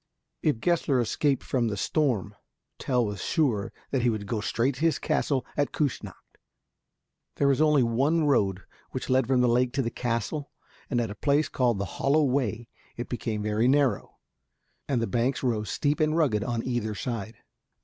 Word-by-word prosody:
If 145 -7 +1
Gessler 160 -5 +2
escaped 135 +4 0
from 120 -3 0
the 105 -2 -2
storm, 115 - 0 0.5
Tell 125 -3 +1
was 100 -3 -4
sure 125 - 0 0.2
that 135 - +1
he 120 - +3
would 110 -3 -2
go 105 +1 -2
straight 120 +6 0
to 130 - -10
his 165 -1 +3
castle 135 -3 0
at 145 -1 0
Küssnacht. 145 -4 -2 1.2
There 140 - +2
was 140 +1 +3
only 150 -4 +4
one 135 +8 +2
road 100 -9 +2 0.3
which - - -3
led 130 -2 +3
from 130 -1 +3
the 125 - +4
lake 120 +1 +2
to 135 -1 0
the 115 - -2
castle, 120 +6 -2 0.4
and 125 - +1
at 115 -3 -1
a - - -4
place 145 +7 +1
called 120 -4 +1
the 100 - -2 0.2
Hollow 150 +3 +3
Way 125 -4 0 0.3
it 120 - -5
became 110 -3 -3
very 105 +3 +1
narrow, 135 -6 +1 0.7
and 125 -4 0
the - - +2
banks 125 +5 0
rose 110 -4 0
steep 145 0 0
and 155 +1 +2
rugged 125 -11 +2
on 115 0 -2
either 120 -4 -2
side. 115 -1 -4
125 Hz, 180 wpm, -27 LUFS, 115-140 Hz, 1.2 s, only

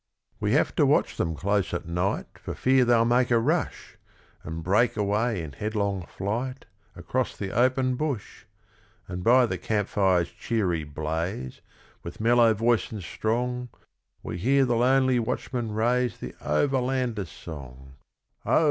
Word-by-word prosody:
We - - 0
have - - +2
to - - +5
watch - - +2
them 80 -1 -1
close 100 +2 0
at 85 - -4
night 90 +3 -2
For - - -6
fear 130 -1 +3
they'll 120 -1 +4
make 120 +1 +3
a 120 - +4
rush, 155 +9 -1 0.5
And 80 0 -6
break 105 +8 +2
away 105 -1 0
in 75 - -7
headlong 100 +1 -2
flight 120 +7 -4 0.3
Across 125 +9 -2
the 95 -2 -4
open 130 +1 +2
bush; 140 -8 -4 0.6
And 90 0 -5
by 125 +3 +6
the 95 -6 -3
camp 105 +1 -1
fire's 95 -4 +2
cheery 95 -9 -1
blaze, 75 -1 -4 0.4
With 85 - -9
mellow 115 0 +4
voice 115 +2 +1
and 105 -4 -6
strong, 125 +6 -2 0.5
We 90 - -5
hear 135 +7 +3
the 120 -2 +1
lonely 130 +1 +3
watchman 120 0 -3
raise 120 +1 +1
The 60 - -7
Overlander's 125 - 0
song: 65 -4 -10 0.5
'Oh! - - +3
110 Hz, 150 wpm, -26 LUFS, 90-125 Hz, 0.6 s, by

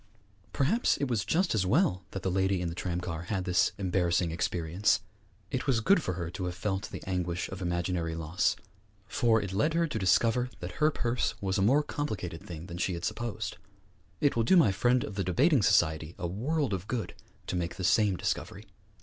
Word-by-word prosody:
Perhaps 170 - +2
it 140 - -1
was 115 -5 0
just 175 +2 +1
as 105 -4 +2
well 95 - +2
that 95 - -6
the 95 - 0
lady 95 0 +1
in 90 -1 -2
the - - -5
tramcar 90 -1 -4
had 95 -1 -2
this 90 -2 +3
embarrassing 90 -3 +1
experience. 85 +3 +1 0.5
It - - -2
was 130 -4 +3
good 180 - +4
for 90 - -2
her 85 -1 -4
to 95 0 -4
have 90 -1 -3
felt 95 +2 -2
the - - -8
anguish 90 -2 -2
of 95 0 -7
imaginary 85 -1 -1
loss, 80 +2 0 0.5
for 115 +2 +2
it 100 -3 -4
led 150 +11 +1
her 170 0 +3
to 150 -9 -3
discover 115 +7 +3
that 90 +1 -5
her 155 - +6
purse 120 -5 -1
was 95 -1 -1
a - - +2
more 135 +9 +4
complicated 105 - -4
thing 85 -2 -8
than 85 -1 -7
she 90 0 0
had 85 - -4
supposed. 120 -4 -3 0.6
It 145 - +2
will 115 - +2
do 150 +12 +5
my 115 - +6
friend 120 +5 +2
of 105 - -6
the 100 0 -1
debating 130 - +3
society 85 -5 +2
a 90 - -4
world 125 - -1
of 95 +1 -4
good 115 -8 -3 0.3
to - - -3
make 85 -1 -2
the 95 - -6
same 100 +1 +3
discovery. - - -3
95 Hz, 205 wpm, -29 LUFS, 90-120 Hz, 0.6 s, her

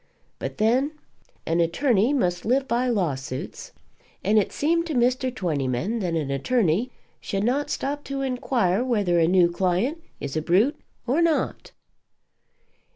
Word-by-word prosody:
But, - - -5
then, 250 +7 +2 0.5
an 165 +1 0
attorney 220 - +2
must 180 -11 0
live 265 +4 +1
by 245 +1 +1
lawsuits, 140 - -3 0.5
and 215 +3 +4
it 200 - -1
seemed 335 +3 +1
to 310 - -3
Mr. 250 +2 +2
Twentyman 170 - -1
that 175 -5 -1
an 150 -4 -1
attorney 200 - +1 0.3
should 195 0 -3
not 265 +6 0
stop 290 +2 -3
to 275 0 -3
inquire 245 -6 0
whether 205 -9 +1
a 165 - +4
new 175 -1 +4
client 190 - 0 0.2
is 140 0 -5
a 155 - 0
brute 210 - +2 0.2
or 265 +7 +1
not. 330 -2 0
220 Hz, 145 wpm, -24 LUFS, 175-260 Hz, 0.5 s, and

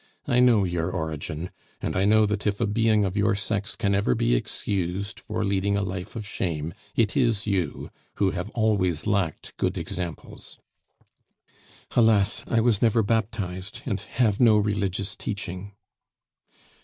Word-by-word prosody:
"I 120 - +3
know 120 -5 +5
your 85 -2 -1
origin, 80 0 -4 0.3
and - - -3
I 95 +2 +2
know 110 +1 +5
that 105 0 -1
if 105 0 0
a 115 - +2
being 110 0 +2
of 95 0 -3
your 100 -1 +2
sex 100 0 -2
can 100 -3 0
ever 100 -11 +2
be - - +2
excused 95 - -2
for - - -3
leading 100 +1 +1
a 100 - 0
life 95 +1 -5
of 110 -2 -5
shame, 80 -6 -3 0.2
it 110 -3 +2
is 115 -6 +2
you, 95 -8 -2 0.2
who 95 -2 +2
have 90 +2 -4
always 100 -8 +1
lacked 100 -7 -1
good - - 0
examples." 85 -1 -6 1.4
"Alas! 110 -4 +3
I 115 - +2
was 115 -3 +2
never 115 -1 +3
baptized, 100 -3 -2
and 100 -6 -1
have 110 0 0
no 115 -3 +6
religious 100 -2 -1
teaching." 100 -1 -5
100 Hz, 155 wpm, -25 LUFS, 95-110 Hz, 1.4 s, no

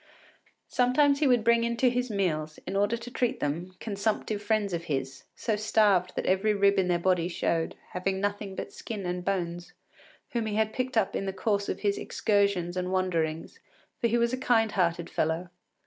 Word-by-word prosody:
Sometimes 280 +3 +3
he 300 - +3
would 245 -3 +4
bring 235 0 +4
in 235 0 -1
to 255 - +3
his 250 0 0
meals, 155 -7 -1
in 195 - -4
order 205 +4 +2
to 235 +1 -9
treat 245 -1 0
them, 170 +6 -3
consumptive 210 0 -2
friends 205 -2 0
of 170 0 -3
his, 135 -2 -3
so 220 - -1
starved 205 -4 +3
that - - -2
every 200 +3 +2
rib 200 0 +4
in 185 - +2
their 175 -1 +2
body 175 -1 +1
showed, 165 -2 -1 0.2
having 190 +1 -1
nothing 205 -1 -2
but - - -6
skin 210 -4 -6
and 180 0 -3
bones, 175 -2 -3 0.6
whom 230 -2 -1
he 210 - -2
had 220 0 +1
picked 255 -1 -2
up 200 -2 +2
in 195 - -2
the - - 0
course 200 0 0
of - - -3
his 200 -1 +1
excursions 200 -5 +1
and 180 0 -2
wanderings, 170 - -1 0.4
for 235 - +2
he 235 +1 +2
was 235 +1 +1
a - - 0
kind 225 -4 +2
hearted 170 -3 0
fellow. 160 +3 -1
200 Hz, 195 wpm, -28 LUFS, 180-225 Hz, 0.6 s, would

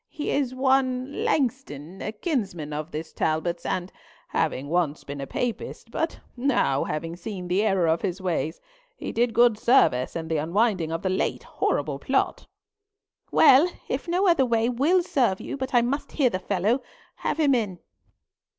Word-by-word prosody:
He 300 - -4
is 260 -3 0
one 260 - +1
Langston, 240 - -2
a 210 - -3
kinsman 200 - -3
of 155 +2 -4
this 160 0 -6
Talbot's; 165 +2 -1
and 185 0 -2 0.4
having 135 +3 -1
once 160 -2 0
been 140 0 -6
a 135 - -5
Papist, 235 - -4
but 325 +5 -2 0.2
now 245 - +1
having 165 +2 -4
seen 180 0 -6
the 180 +3 +2
error 195 -5 +2
of 160 +1 +2
his 190 -1 -2
ways, 175 -3 -2 0.4
he - - -5
did 240 +1 +1
good 235 -2 +4
service 130 - +3
in 165 -1 -4
the 160 -1 0
unwinding 175 +1 +1
of 165 +1 -3
the 190 - +1
late 190 - -1
horrible - - -1
plot." - - 0 0.8
"Well, 305 +3 +7 0.2
if - - -3
no 360 +3 +2
other 335 -6 +5
way 230 -2 +2
will 300 +9 +2
serve 260 - +1
you - - -5
but 265 -1 -4
I 240 -2 +4
must 275 +5 -2
hear 265 -5 +2
the 185 - -2
fellow, 205 +7 0 0.4
have - - -2
him 290 -3 +4
in." 210 -7 0
215 Hz, 170 wpm, -25 LUFS, 170-260 Hz, 0.8 s, Well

